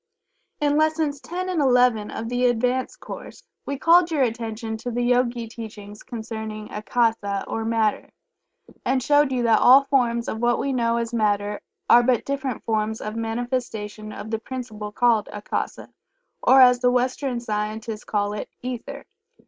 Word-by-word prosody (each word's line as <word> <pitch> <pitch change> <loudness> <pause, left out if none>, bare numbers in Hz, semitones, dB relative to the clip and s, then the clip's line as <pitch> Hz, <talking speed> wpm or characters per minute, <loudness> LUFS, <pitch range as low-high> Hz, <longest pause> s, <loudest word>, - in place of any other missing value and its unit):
In 290 0 +2
Lessons 310 -2 +1
X 255 - -15
and 365 -2 -1 0.5
XI, - - -8
of 225 - -4
the 245 +1 +1
"Advanced 250 +2 0
Course" - - -9 0.2
we 280 - -2
called 340 +4 +5
your 305 -5 +2
attention 225 -1 -3
to 235 +3 -5
the 245 0 -1
Yogi 240 -1 +1
teachings 210 -2 -9
concerning 220 -2 -6
Akasa 210 -2 0
or 225 - -3
Matter, 225 -1 0 0.7
and 260 -1 +1
showed 290 +1 +3
you 250 -2 0
that 225 -2 +4
all 265 +3 +7
forms 240 -4 +1
of 220 - -3
what 240 +1 +2
we 275 - -1
know 235 -2 +1
as 235 0 -3
Matter 205 -2 0 0.3
are 240 - +7
but 245 -1 +1
different 275 -3 -3
forms 220 0 -1
of 215 +1 -5
manifestation 225 -2 -4
of 215 +1 -8
the 225 - -1
principle 225 -4 -6
called 230 -1 +2
Akasa, 210 0 -4 0.5
or 265 0 +6
as 250 -1 +7
the 250 0 +3
Western 250 +1 0
scientists 215 0 -4
call 205 -1 -1
it, 210 - -5
"Ether." 255 +3 -6
235 Hz, 160 wpm, -23 LUFS, 220-255 Hz, 0.7 s, all